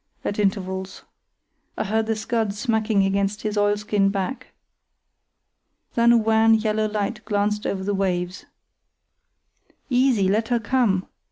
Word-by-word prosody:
at 205 - -2
intervals. 190 -1 -2 0.7
I - - 0
heard 220 +2 0
the 225 - 0
scud 220 -1 -2
smacking 220 -2 +1
against 195 +1 -1
his 215 -1 -2
oilskin 205 -1 +1
back. 200 +6 -3 1.5
Then 235 0 +4
a 235 - +6
wan, 225 0 +4
yellow 215 0 0
light 210 +1 -3
glanced 210 0 -1
over 190 -1 -2
the 205 +1 -1
waves. 180 -2 -2 1.4
"Easy! 250 -6 +3
Let 215 +4 +1
her 240 -1 +1
come!" 215 -5 +1
210 Hz, 125 wpm, -23 LUFS, 195-225 Hz, 1.5 s, a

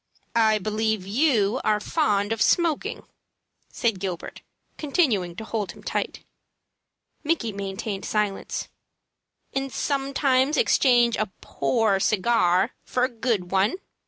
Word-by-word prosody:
"I 220 -2 +4
believe 215 -1 -1
you 230 0 +2
are 210 -1 +2
fond 210 -6 0
of 225 - -5
smoking," 335 -4 +1 0.7
said 225 -5 0
Gilbert, 180 -3 -5 0.3
continuing 250 - 0
to 220 - -6
hold 220 -3 -3
him - - -16
tight. - - -3 1.0
Micky 290 -9 0
maintained 195 0 -4
silence. 210 -2 -2 0.9
"And 270 0 -2
sometimes 275 0 +1
exchange 245 - +4
a 215 - -1
poor 195 +9 +1
cigar 195 -1 +2
for 250 - -1
a 255 - +2
good 225 -7 -2
one?" 195 - +2
220 Hz, 115 wpm, -25 LUFS, 200-260 Hz, 1.0 s, I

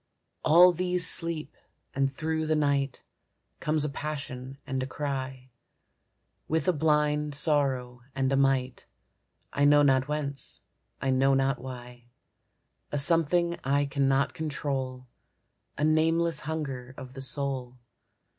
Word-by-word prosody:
All 175 +3 +7
these 180 0 +1
sleep, 165 -1 +2 0.4
and 135 0 0
through 160 +2 -2
the 155 - +2
night, 140 -2 0 0.6
Comes 155 -1 +1
a - - -1
passion 135 -3 -6
and 130 0 -3
a 130 - -3
cry, 130 -2 -5 1.0
With 160 +3 -1
a 185 - +4
blind 150 -1 +1
sorrow 135 -5 0
and 135 0 0
a - - +3
might, 135 -2 0 0.7
I 145 - +1
know 145 0 +6
not 135 -1 +3
whence, 145 -2 -4 0.4
I 135 - 0
know 135 +1 +3
not 135 -1 +1
why, 125 -1 -10 0.9
A 145 - -1
something 170 +3 +3
I 140 +2 +1
cannot 135 -1 +1
control, 135 -4 -4 0.7
A 150 - -2
nameless 160 +1 +2
hunger 135 -5 -5
of 130 -1 -9
the 135 - -8
soul. 130 -2 -3
140 Hz, 125 wpm, -28 LUFS, 130-155 Hz, 1.0 s, All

